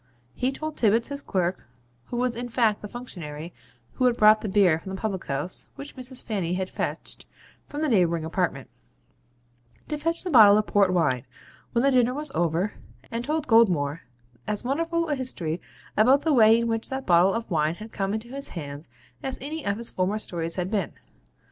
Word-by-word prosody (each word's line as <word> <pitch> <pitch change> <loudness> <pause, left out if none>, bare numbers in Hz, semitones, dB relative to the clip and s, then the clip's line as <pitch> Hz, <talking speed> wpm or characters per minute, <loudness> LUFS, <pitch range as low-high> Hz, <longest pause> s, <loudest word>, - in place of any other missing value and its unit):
He 255 +1 0
told 310 +3 -6
Tibbits, 225 +2 +2
his 280 0 -4
clerk 180 - -2 0.4
(who 240 - -5
was 245 -1 0
in 245 +1 -4
fact 225 -3 +2
the 210 - -6
functionary 170 -9 -8 0.4
who 255 - 0
had 245 -1 +3
brought 215 0 +6
the 215 - -3
beer 190 -5 +4
from 190 +3 -7
the - - -7
public 200 -5 -3
house, 140 +7 -2
which 280 +1 -9
Mrs. 255 -1 -4
Fanny 185 -5 -1
had 190 0 -3
fetched - - -4 0.4
from 295 +1 -4
the - - +2
neighbouring 170 - +2
apartment) 165 -5 -1 1.2
to 300 -1 -2
fetch 330 +2 -1
'the 365 - -3
bottle 210 -6 +8
of 215 - +1
port 200 -3 +3
wine,' 150 -9 +1 0.5
when 235 - +2
the 275 - +4
dinner 250 -1 +3
was 300 0 -3
over; 170 +4 0 0.4
and 230 +1 -3
told 305 +3 -1
Goldmore 175 - +3 0.5
as 210 +1 -1
wonderful 330 +6 0
a 300 - 0
history 180 - -2 0.3
about 260 +6 +5
the 320 - +2
way 225 -3 +7
in 235 0 0
which 225 0 -2
that 265 0 -4
bottle 180 +2 +4
of 230 -3 -4
wine 155 0 +1
had 215 +4 -10
come 195 0 -1
into 220 +2 -6
his 275 +2 -5
hands 145 0 -7 0.3
as 265 -1 -3
any 300 +3 -5
of 200 0 -1
his 235 0 +1
former 185 +3 0
stories 165 -5 -3
had 185 +1 -2
been. 200 -7 -1
215 Hz, 195 wpm, -26 LUFS, 180-255 Hz, 1.2 s, bottle